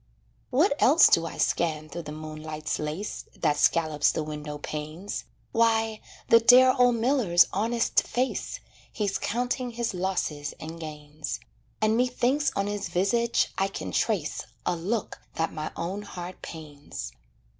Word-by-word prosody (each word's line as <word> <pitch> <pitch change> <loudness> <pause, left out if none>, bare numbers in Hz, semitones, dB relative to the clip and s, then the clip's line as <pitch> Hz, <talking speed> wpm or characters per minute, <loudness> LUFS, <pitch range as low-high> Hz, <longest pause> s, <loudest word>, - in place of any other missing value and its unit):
What 290 +9 +3
else 300 +7 +7
do 165 0 +4
I - - -8
scan 155 -2 0
through 170 +2 -6
the 150 -2 -8
moonlight's 155 0 -5
lace 155 +7 -4
That 145 - +1
scallops 155 0 +3
the 155 - -2
window 150 -1 -6
panes; 155 +6 -5 0.3
Why, 225 -1 +2 0.3
the 230 - +7
dear 250 +2 +7
old 245 -1 +5
miller's 230 -7 +4
honest 230 +4 +2
face, 255 +2 -2 0.3
He's 205 -3 -1
counting 245 +2 -1
his 235 -2 -2
losses 175 -6 -2
and 160 +2 -7
gains, 150 -1 -6 0.4
And 215 0 +3
methinks 250 +3 +2
on 200 - 0
his 205 -1 -3
visage 235 +6 +2
I 195 - +3
can 195 - -6
trace 190 -10 -1 0.2
A 180 - +1
look 200 +6 -3
that 165 0 -1
my 155 0 -4
own 190 +4 -3
heart 180 -3 -8
pains. 145 - -8
185 Hz, 145 wpm, -27 LUFS, 155-230 Hz, 0.4 s, else